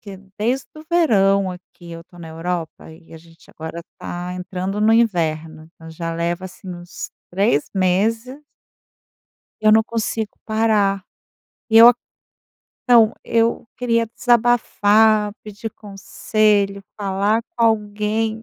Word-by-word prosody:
que 200 -2 -10 0.2
desde 245 +5 -1
o - - -10
verão 200 - +3
aqui 180 -1 -13
eu 165 0 -9
tô 175 - -19
na 165 -1 -9
Europa 165 0 -5
e 165 +1 -17
a 160 - -10
gente 165 0 -20
agora 160 +1 -8 0.2
tá 175 +1 -6
entrando 185 +2 -4
no 215 +1 +3
inverno. 160 -8 0
Então, 160 0 -13
já 165 +1 -5
leva, 170 +2 -2
assim, 185 +1 -13
uns 175 0 -9 0.2
3 190 -5 +1
meses 225 +9 0 1.2
eu 215 0 +5
não 220 0 +5
consigo 225 -1 -3
parar, 210 -3 +1 0.6
eu 225 +1 +8
a 245 - +4 0.9
Então, 230 -3 +5
eu 230 0 0
queria 230 -2 0
desabafar, 220 -3 +3
pedir 215 +1 -8
conselho, 200 0 -1 0.2
falar 200 +3 0
com 230 - +2
alguém, 215 0 -1
205 Hz, 125 wpm, -20 LUFS, 180-225 Hz, 1.2 s, eu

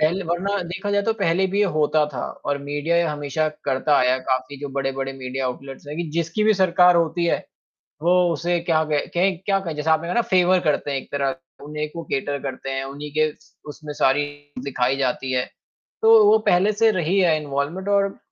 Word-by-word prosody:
पहले 175 +5 +1
वरना 180 +4 -1
देखा 190 +4 -5
जाए 205 0 +2
तो 225 +2 +1
पहले 190 -2 +1
भी 200 - 0
ये 210 - +5
होता 150 0 +3
था 120 - -3 0.2
और 145 0 -1
मीडिया 145 +4 -1
ये 170 - +4
हमेशा 150 0 -1 0.2
करता 140 +2 +2
आया 130 +1 +3
काफ़ी 130 +2 -2
जो 145 - -4
बड़े-बड़े 135 0 -3
मीडिया 130 0 -5
आउटलेट्स 135 +2 -7
हैं, 150 - -6
कि 170 -1 -3
जिसकी 170 +5 0
भी 215 0 +4
सरकार 180 -1 +4
होती 170 +1 +1
है, - - +2 0.7
वो 175 +2 +4 0.2
उसे 175 +1 -1
क्या 160 -1 +3
कहें 150 -2 -1
कहें 185 +1 +2
क 170 - -24
क्या 195 -1 +2
कहें? 165 -5 -5
जैसे 150 +2 -2
आपने 160 +1 +2
कहा 180 - -2
ना 240 - +4
फ़ेवर 185 -3 +3
करते 150 -2 0
हैं 140 - -1
एक 135 - -9
तरह, 140 -1 -1 0.3
उन्हीं 150 +1 -4
को 170 +2 -7
कैटर 140 -1 -2
करते 135 0 -5
हैं, 135 0 -2
उन्हीं 145 +2 -8
के 155 0 +3
स 155 - -25 0.2
उसमें 150 0 -8
सारी 145 +1 +2 0.4
दिखाई 135 -1 0
जाती 130 0 -1
है, 125 -1 +1 0.6
तो 445 0 +7
वो 425 +1 +6
पहले 185 +4 +4
से 225 +2 +3
रही 185 +1 0
है 170 -4 +4
इनवॉल्वमेंट, 145 +7 -3
और 200 -1 +1
155 Hz, 215 wpm, -22 LUFS, 140-180 Hz, 0.7 s, तो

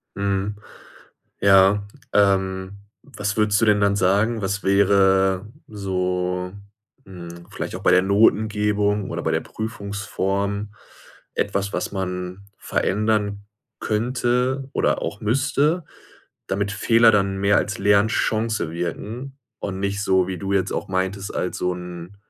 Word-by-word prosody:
Mhm, 100 +1 -1 0.8
ja, 95 +1 +5 0.3
ähm, 95 -1 +1 0.2
was 105 -6 -4
würdest 105 -1 +2
du - - +4
denn 105 -1 +4
dann 100 0 +2
sagen, 100 +5 +2
was 100 +1 -2
wäre 95 0 +3 0.2
so, 90 -2 -2 0.5
hm, 85 -2 -10
vielleicht - - -5
auch - - -6
bei - - +4
der 90 - +5
Notengebung 105 0 +2
oder - - -3
bei - - 0
der - - +1
Prüfungsform 100 -1 -3 0.6
etwas, 100 0 -1
was - - -3
man 90 0 -4
verändern 105 0 0 0.4
könnte 125 +4 0
oder - - +1
auch 85 +5 -4
müsste, 140 - +1 0.6
damit 100 +1 -1
Fehler 115 +3 +5
dann 100 -2 +1
mehr 100 +1 +3
als 105 - -1
Lernchance 110 -1 +1
wirken 110 - -5 0.2
und 95 -1 -4
nicht 100 +1 -1
so, 95 -2 +2
wie 95 -1 -4
du 100 +2 -3
jetzt 95 -2 +1
auch - - -3
meintest, 95 +1 -2
als 90 - -2
so 90 - 0
'n 90 +1 -9
100 Hz, 130 wpm, -22 LUFS, 95-105 Hz, 0.8 s, ja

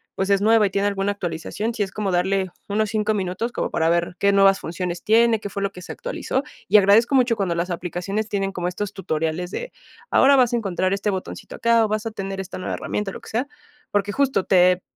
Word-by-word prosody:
pues, 195 +1 -1
es 200 0 +3
nueva 220 0 +5
y - - -7
tiene 200 +1 +1
alguna 200 0 0
actualización, 195 +5 -4
sí 215 - 0
es 195 - -6
como 200 -1 -2
darle 190 +1 +1 0.2
unos 215 +1 0
5 215 0 0
minutos 195 +4 -2
como - - -2
para 160 - +1
ver, 170 +1 0
qué 200 - +3
nuevas 195 0 +5
funciones 175 +1 -4
tiene, 225 +1 +4
qué 205 - -6
fue 200 +1 -5
lo 200 - -1
que 180 - -11
se - - -8
actualizó. 485 - -3 0.3
Y - - +7
agradezco 210 +6 +5
mucho 250 -3 +3
cuando 190 -4 0
las 170 +2 -2
aplicaciones 180 +5 -3
tienen 195 -1 -1
como 175 -2 -2
estos 195 +2 -4
tutoriales 165 0 -2
de, - - -5 0.4
ahora 275 +1 +6
vas 245 -2 +3
a - - +3
encontrar 185 -4 -1
este 200 +1 -1
botoncito 190 -1 -6
acá, 230 -1 +3
o - - -1
vas 215 +1 -2
a - - -4
tener 195 -2 -5
esta 190 - -8
nueva 185 - -4
herramienta 210 -2 -3
o - - -11
lo - - -8
que - - -12
sea, 245 +5 -1 0.4
porque 205 0 0
justo 270 -5 +1
te 180 -1 +4
200 Hz, 235 wpm, -22 LUFS, 185-220 Hz, 0.4 s, Y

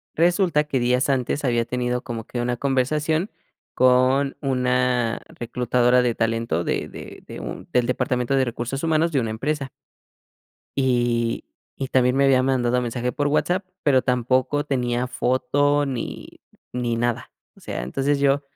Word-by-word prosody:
resulta 175 -2 +3
que 135 -4 -1
días 125 +2 +2
antes 135 +2 0
había 120 -2 +2
tenido 125 0 -2
como 115 -3 -5
que 120 - -4
una 120 0 -1
conversación 150 - 0 0.4
con 130 +2 +3
una 125 -3 +1
reclutadora 125 +1 +1
de 120 -2 +1
talento 115 -7 0
de - - -2
de - - -10
de - - -8
un - - -7
del 125 -1 +2
departamento 125 +1 0
de 135 - +3
recursos 120 +3 -4
humanos 165 0 +2
de 135 - +2
una 115 -2 -2
empresa. 135 +4 -2 1.1
Y 120 -3 +1 0.4
y 135 - -1
también 125 0 +2
me 140 - +4
había 130 -2 +4
mandado 125 -2 +1
mensaje 120 +1 -2
por 145 +2 0
WhatsApp, 180 +6 +1 0.2
pero 130 -3 +4
tampoco 130 +3 +1
tenía 125 -3 -1
foto 145 +4 +1
ni 130 -4 -6 0.3
ni 120 -2 -1
nada. 120 0 -2 0.2
O - - -19
sea, - - -5
entonces 135 - 0
yo, 140 0 +2
125 Hz, 150 wpm, -23 LUFS, 120-140 Hz, 1.1 s, me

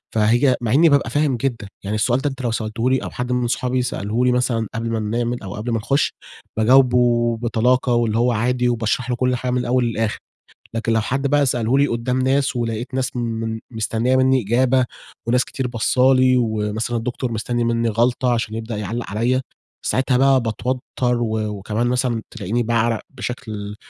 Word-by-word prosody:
فهي 120 +5 +3
مع 115 -1 -1
إني 160 +4 +6
بابقى 140 -1 +2
فاهم 145 -4 +1
جدًا، 115 -5 -3 0.2
يعني 100 +2 -2
السؤال 120 +4 +2
ده 145 +2 -1
أنت 135 -1 -8
لو 120 -2 -1
سألته 115 +2 -1
لي 130 - +3
أو - - -4
حد 125 0 -4
من 125 -1 +1
صحابي 125 +1 0
سأله 120 0 -1
لي 125 - +4
مثلًا 120 -3 0
قبل 115 +1 -3
ما 115 -1 -1
بنعمل 120 +2 -2
أو 95 - -6
قبل 115 +3 -4
ما 115 - +1
نخُش، 135 +6 0 0.4
باجاوبه 120 -1 +4
بطلاقة 120 +2 +1
واللي 115 -2 +1
هو 120 +1 +3
عادي 125 +2 +1
وباشرح 120 +1 -1
له 125 - +1
كل 125 0 +1
حاجة 125 +1 -2
من 125 - +1
الأول 125 0 +1
للآخر، 115 -2 -1 0.6
لكن 115 0 -1
لو 110 - +3
حد 135 +5 -1
بقى 145 0 +3
سأله 120 +1 +1
لي 140 - +4
قدّام 120 +1 -1
ناس 135 0 +1
ولقيت 120 +2 -3
ناس 130 -1 -2
من 115 -1 -3
مستنية 115 +2 0
منّي 130 -1 +3
إجابة 125 +4 +2 0.4
وناس 125 +2 +2
كتير 130 -2 -4
باصة 125 +3 +3
لي 130 0 +4
ومثلًا 110 0 -1
الدكتور 120 +1 -3
مستني 120 +2 -1
منّي 115 0 +1
غلطة 120 +3 +1
عشان 115 -2 -1
يبدأ 115 0 -4
يعلق 105 +3 -4
عليَّ، 120 +5 +1 0.5
ساعتها 130 0 +1
بقى 135 0 +4
باتوتر 125 +3 -2 0.4
و 110 -1 -1
وكمان 105 +3 -2
مثلًا 125 -2 0
تلاقيني 120 +6 -2
باعرق 115 0 +1
بشكل 110 -5 -6
120 Hz, 190 wpm, -21 LUFS, 115-125 Hz, 0.6 s, إني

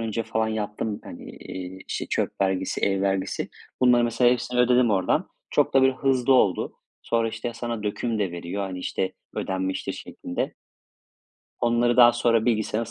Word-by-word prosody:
önce 115 0 -2
falan 110 0 -1
yaptım, 105 0 -3
hani, - - -9
eee, 95 0 -8
işte, - - -3
çöp - - -1
vergisi, 95 -1 0
ev 95 -1 +1
vergisi. 95 -1 -1 0.3
Bunları 125 -1 +5
mesela 120 +1 +3
hepsini 125 0 0
ödedim 125 -1 +4
oradan. 95 -3 +1 0.2
Çok - - +2
da 135 - +6
böyle 130 0 +5
hızlı 130 -1 +2
oldu. 100 -8 +3 0.3
Sonra, 115 -1 +1
işte, 110 +2 -4
sana 120 -2 -4
döküm 110 +2 -2
de 100 -4 -1
veriyor, 85 +3 -4
hani, 95 -2 -4
işte, 95 +1 -2 0.2
ödenmiştir 95 0 -2
şeklinde. 90 - -5 1.1
Onları 120 0 +2
daha 120 -1 +8
sonra 115 -1 +2
bilgisayarında 115 -1 0
110 Hz, 160 wpm, -25 LUFS, 95-120 Hz, 1.1 s, daha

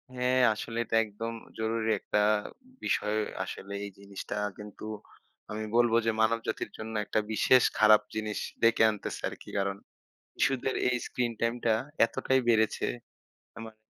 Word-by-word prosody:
হ্যাঁ 125 +1 +2
আসলে 115 +2 -6
এটা 115 - -1
একদম 115 +3 -5 0.3
জরুরি 110 0 0
একটা 105 - 0 0.6
বিষয় 105 +1 0 0.3
আসলে 100 +1 -7
এই 100 - -7
জিনিসটা। 100 0 -7 0.2
কিন্তু 105 0 -9 0.7
আমি 110 +1 -3
বলবো 120 -1 +4
যে 115 - +3
মানবজাতির 110 0 0
জন্য 110 +1 -6
একটা 110 - 0
বিশেষ 125 +3 +5 0.2
খারাপ 110 0 +7
জিনিস 110 -1 -2 0.2
ডেকে 115 -1 +5
আনতেছে 105 -2 -4
আরকি। - - -11
কারণ 100 0 0 0.7
শিশুদের 135 0 +1
এই 125 - +2
স্ক্রিন-টাইমটা 115 -1 0 0.3
এতটাই 130 +3 +1
বেড়েছে। 110 -2 +3 0.7
অ্যা - - -11
মানে 110 -1 -12
110 Hz, 135 wpm, -29 LUFS, 105-115 Hz, 0.7 s, খারাপ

